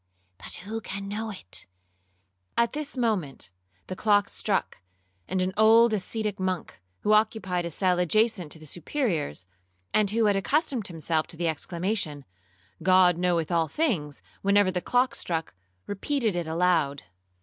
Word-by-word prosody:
'—'But - - -6
who 225 +2 -4
can 200 -1 -5
know 220 +2 -3
it?' 95 - -8 0.9
At 235 0 +2
this 295 -2 -4
moment 205 - -1 0.3
the 185 - -5
clock 205 0 +3
struck, - - -1 0.5
and 185 -1 0
an 185 +1 -2
old 225 +2 +6
ascetic 210 0 -2
monk, 185 - -3 0.2
who 210 - +3
occupied 210 -5 +1
a - - -4
cell 180 +2 +1
adjacent 190 -2 +1
to - - -11
the 155 - -13
Superior's, 165 - -2 0.5
and 215 -2 +4
who 225 +2 +2
had 205 -1 +3
accustomed 255 - 0
himself 160 -2 -1
to 165 - -8
the 170 0 0
exclamation, 165 -2 -2 0.6
'God 180 0 +5
knoweth 175 -3 +1
all 165 -1 +2
things,' 155 - -1 0.2
whenever 200 -1 +4
the 180 -1 -2
clock 250 +4 +2
struck, 165 -2 -2 0.3
repeated 220 +1 -1
it 175 -2 -2
aloud. 160 -4 +1
185 Hz, 150 wpm, -27 LUFS, 170-220 Hz, 0.9 s, old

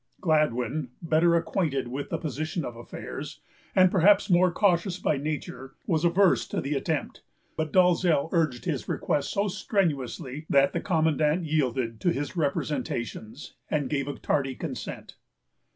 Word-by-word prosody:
Gladwyn, 150 -4 +1
better 165 +1 +3
acquainted 160 -6 0
with 135 +4 -5
the - - -1
position 155 +1 -3
of 120 - -6
affairs, 120 - -8 0.4
and 185 -1 +6
perhaps 195 +2 +4
more 180 +1 +5
cautious 180 -1 +1
by 155 -5 0
nature, 150 -1 -5
was 160 -1 0
averse 175 +2 +3
to - - -2
the 140 +2 -2
attempt; 150 +2 -2 0.3
but 155 -1 -2
Dalzell 180 -4 +3
urged 155 -8 0
his 150 -8 -3
request 145 -2 -1
so 200 +1 0
strenuously 155 - -2
that 140 0 +4
the - - -1
commandant 160 -1 +1
yielded 130 -7 -1
to 175 - +2
his 145 +2 -3
representations, 135 -5 -3 0.2
and 145 -2 -1
gave 140 -2 -1
a 145 - -4
tardy 135 -2 -1
consent. - - -7
155 Hz, 145 wpm, -27 LUFS, 140-175 Hz, 0.4 s, and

